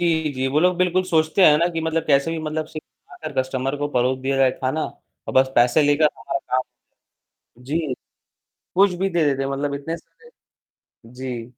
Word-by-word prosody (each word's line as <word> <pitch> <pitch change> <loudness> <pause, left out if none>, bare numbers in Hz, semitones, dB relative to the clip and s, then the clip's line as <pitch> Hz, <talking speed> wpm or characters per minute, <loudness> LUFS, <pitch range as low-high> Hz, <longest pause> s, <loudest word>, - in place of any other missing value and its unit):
जी 160 -3 +1
जी, 130 -1 -2
वो 145 +3 +1
लोग 180 +1 +3
बिल्कुल 180 +1 +2
सोचते 160 +1 +2
हैं 150 -3 +7
ना 170 - +3
कि 165 - -2
मतलब 160 0 -1
कैसे 140 +1 +3
भी 165 - -3
मतलब 155 0 -3
सिर्फ 155 0 -9 0.2
बनाकर 155 -1 -8
कस्टमर 130 +1 -2
को 145 - -1
परोस 130 -1 +1
दिया 135 +1 -1
जाए 135 -1 +4
खाना 135 +4 -1
और - - -11
बस 130 0 +5
पैसे 120 +5 +4
लेकर 145 +1 +3
हमारा 115 - -3
काम 130 -1 -1 1.0
जी। 150 +1 -2 0.8
कुछ 195 +1 +4
भी 195 +1 +1
दे 170 -3 +1
देते 135 -2 +1
हैं 135 - -2
मतलब 140 +1 -2
इतने 145 +4 -4
सारे 465 - -20 0.8
जी, 125 -2 -5
150 Hz, 190 wpm, -22 LUFS, 130-165 Hz, 1.0 s, हैं